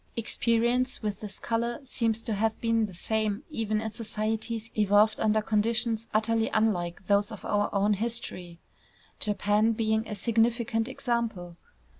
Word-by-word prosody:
Experience 235 Hz, +2 st, +1 dB
with 210 Hz, -1 st, -2 dB
this 210 Hz, -2 st, -6 dB
color 235 Hz, +1 st, -2 dB
seems 230 Hz, -4 st, -1 dB
to 225 Hz, -, -2 dB
have 220 Hz, +2 st, 0 dB
been 230 Hz, -1 st, +1 dB
the 190 Hz, -, -11 dB
same 215 Hz, -, -1 dB
even 215 Hz, -5 st, -1 dB
in 220 Hz, 0 st, -3 dB
societies 220 Hz, +1 st, -3 dB
evolved 210 Hz, +1 st, +4 dB
under 215 Hz, 0 st, +2 dB
conditions 225 Hz, +1 st, 0 dB
utterly 225 Hz, +1 st, +1 dB
unlike 190 Hz, -5 st, 0 dB
those 205 Hz, +1 st, +2 dB
of 215 Hz, -, -9 dB
our 205 Hz, 0 st, +1 dB
own 205 Hz, +1 st, +2 dB
history, 200 Hz, -5 st, -1 dB, 0.6 s
Japan 210 Hz, +2 st, +2 dB
being 220 Hz, 0 st, 0 dB
a 210 Hz, -, -4 dB
significant 225 Hz, +1 st, +1 dB
example. 230 Hz, -9 st, -2 dB
220 Hz, 140 wpm, -28 LUFS, 210-230 Hz, 0.6 s, evolved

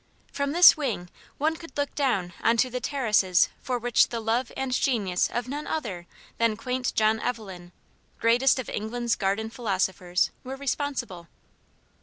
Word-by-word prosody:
From 280 Hz, 0 st, -2 dB
this 350 Hz, +3 st, +8 dB
wing 230 Hz, -, -3 dB, 0.3 s
one 315 Hz, +3 st, +1 dB
could 330 Hz, -5 st, -12 dB
look 285 Hz, 0 st, -1 dB
down 200 Hz, -11 st, 0 dB
on 230 Hz, +1 st, +3 dB
to 255 Hz, +2 st, +2 dB
the 250 Hz, -, -2 dB
terraces 215 Hz, -10 st, +2 dB
for 250 Hz, -1 st, -2 dB
which 240 Hz, 0 st, +3 dB
the 235 Hz, -, -3 dB
love 230 Hz, +3 st, -1 dB
and 265 Hz, -1 st, -2 dB
genius 220 Hz, -9 st, +1 dB
of 240 Hz, 0 st, -3 dB
none 290 Hz, +3 st, -5 dB
other 180 Hz, -, -4 dB, 0.3 s
than 230 Hz, -2 st, +2 dB
quaint 250 Hz, +1 st, -2 dB
John 220 Hz, 0 st, +3 dB
Evelyn 195 Hz, -8 st, -5 dB, 0.5 s
greatest 240 Hz, +4 st, +4 dB
of 255 Hz, -, -4 dB
England's 235 Hz, +2 st, -2 dB
Garden 215 Hz, +2 st, -1 dB
Philosophers 190 Hz, -5 st, 0 dB
were 260 Hz, +1 st, -6 dB
responsible. 270 Hz, -, -3 dB
235 Hz, 155 wpm, -26 LUFS, 200-265 Hz, 0.5 s, this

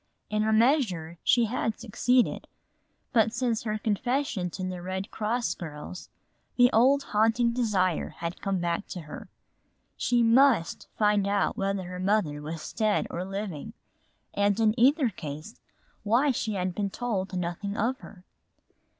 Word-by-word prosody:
In 215 Hz, 0 st, +1 dB
a 220 Hz, -, +1 dB
measure 215 Hz, -, +2 dB
she 240 Hz, -1 st, +4 dB
had 225 Hz, -1 st, -2 dB
succeeded, 245 Hz, +2 st, +1 dB, 0.7 s
but 225 Hz, -2 st, +4 dB
since 230 Hz, -1 st, -1 dB
her 215 Hz, -2 st, -2 dB
confession 220 Hz, -2 st, -1 dB
to 185 Hz, -, -6 dB
the 180 Hz, -1 st, -5 dB
Red 190 Hz, +3 st, -4 dB
Cross 230 Hz, +3 st, -1 dB
girls 160 Hz, +2 st, -8 dB, 0.5 s
the 245 Hz, 0 st, +5 dB
old 270 Hz, +5 st, +4 dB
haunting 225 Hz, +3 st, +3 dB
desire 200 Hz, -8 st, 0 dB
had 170 Hz, +2 st, -6 dB
come 195 Hz, -1 st, -1 dB
back 175 Hz, +2 st, -2 dB
to 180 Hz, -, -6 dB
her. 155 Hz, -1 st, -10 dB, 0.7 s
She 240 Hz, -1 st, +2 dB
must 230 Hz, -6 st, +3 dB
find 210 Hz, -2 st, +3 dB
out 200 Hz, 0 st, +1 dB
whether 195 Hz, -1 st, -1 dB
her 180 Hz, 0 st, -7 dB
mother 185 Hz, -7 st, 0 dB
was 155 Hz, +1 st, -6 dB
dead 215 Hz, -2 st, +1 dB
or 175 Hz, -, -3 dB
living 195 Hz, 0 st, -5 dB, 0.6 s
and 205 Hz, +1 st, +1 dB
in 220 Hz, -1 st, +4 dB
either 270 Hz, +1 st, +4 dB
case 155 Hz, +2 st, -8 dB, 0.4 s
why 240 Hz, +7 st, +3 dB
she 220 Hz, -3 st, -2 dB
had 180 Hz, -1 st, -1 dB
been 200 Hz, +1 st, -2 dB
told 195 Hz, -5 st, -3 dB
nothing 180 Hz, +4 st, -3 dB
of 255 Hz, +5 st, 0 dB
her. 180 Hz, -9 st, -13 dB
210 Hz, 150 wpm, -27 LUFS, 180-235 Hz, 0.7 s, the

